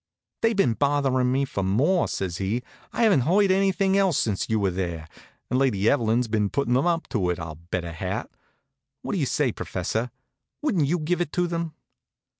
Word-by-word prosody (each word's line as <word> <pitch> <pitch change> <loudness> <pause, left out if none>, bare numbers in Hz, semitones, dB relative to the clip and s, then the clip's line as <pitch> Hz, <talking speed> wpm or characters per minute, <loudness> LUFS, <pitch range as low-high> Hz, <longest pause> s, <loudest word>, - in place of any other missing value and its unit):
"They've 225 0 +2
been 130 - +3
bothering 135 -2 +1
me 135 +2 +1
for 100 - -3
more," 140 - +2
says 90 -3 -3
he. 105 +6 -2 0.3
"I - - 0
haven't 210 -10 +5
heard 190 +8 +3
anything 195 0 +2
else 195 -6 +3
since 105 -4 -1
you 110 -1 +1
were 100 -2 +1
there. 85 -3 -4 0.4
And 130 - 0
Lady 110 -7 +2
Evelyn's 120 -2 +2
been 105 -2 0
putting 140 0 0
them 135 +7 +2
up 170 -1 0
to 95 -8 0
it, 90 - 0
I'll 80 -1 -7
bet 90 -1 -2
a 85 - -5
hat. 85 - -4 0.8
What - - -3
do 195 - 0
you 140 - +1
say, 140 -2 +1
professor? 110 +6 -3 0.5
Wouldn't 200 - +1
you 175 +5 +1
give 175 +3 -1
it 170 - -2
to 180 - +1
them?" 170 -2 -3
130 Hz, 200 wpm, -25 LUFS, -, 0.8 s, haven't